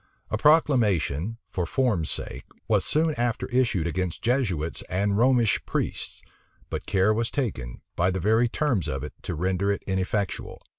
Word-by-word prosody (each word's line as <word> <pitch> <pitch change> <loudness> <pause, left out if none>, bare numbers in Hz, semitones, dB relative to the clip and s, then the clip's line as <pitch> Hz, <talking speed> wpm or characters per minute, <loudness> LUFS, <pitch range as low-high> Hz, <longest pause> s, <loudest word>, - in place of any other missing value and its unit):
A 110 - +1
proclamation, 115 - +3
for 90 -2 -2
form's 110 - +1
sake, - - -5 0.2
was - - +3
soon 155 +1 +1
after 120 -2 0
issued 115 -9 +2
against 90 0 -2
Jesuits 100 - 0
and 100 +3 +1
Romish 120 -1 +3
priests: - - -3 0.5
but - - -4
care 100 +2 +3
was 115 +1 0
taken, 90 - -3
by 90 +2 +2
the 95 0 -1
very 110 +5 +3
terms 125 - 0
of 65 +1 -3
it, 75 - -6
to 85 - -4
render 95 +4 0
it 100 - -3
ineffectual. 95 +1 -2
100 Hz, 155 wpm, -26 LUFS, 90-120 Hz, 0.5 s, proclamation